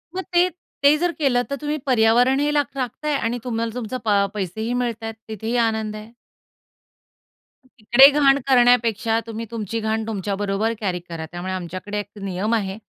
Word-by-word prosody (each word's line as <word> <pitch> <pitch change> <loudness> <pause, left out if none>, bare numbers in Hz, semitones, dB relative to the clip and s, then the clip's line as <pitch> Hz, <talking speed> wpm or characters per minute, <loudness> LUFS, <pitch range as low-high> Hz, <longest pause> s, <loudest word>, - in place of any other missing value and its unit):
मग 375 - -2
ते, 355 +1 +4
ते 305 -4 +1
जर 350 +2 0
केलं 245 -4 +2
तर 280 - -2
तुम्ही 300 +1 -2
पर्यावरणही 255 +4 +3
लाख 290 -2 0
राखताय 275 +4 -2
आणि 240 -2 -1
तुम्हाला 230 -2 -2
तुमच 240 -2 -5
पा 200 -2 +3
पैसेही 215 +4 -3
मिळतायत. 235 -2 -2
तिथेही 220 +2 -4
आनंद 220 -1 -3
आहे. 215 +2 -10 1.5
तिकडे 250 +2 +6
घाण 275 -1 +5
करण्यापेक्षा 235 -3 +3
तुम्ही 230 0 -5
तुमची 230 -1 -3
घाण 220 0 -1
तुमच्या 200 -2 -3
बरोबर 205 +3 -1
कॅरी 185 -4 -2
करा. 165 -2 -7
त्यामुळे 180 +2 -5
आमच्याकडे 185 +3 -5
एक 205 - -6
नियम 195 +3 -2
आहे. 195 -3 -2
225 Hz, 160 wpm, -22 LUFS, 205-250 Hz, 1.5 s, तिकडे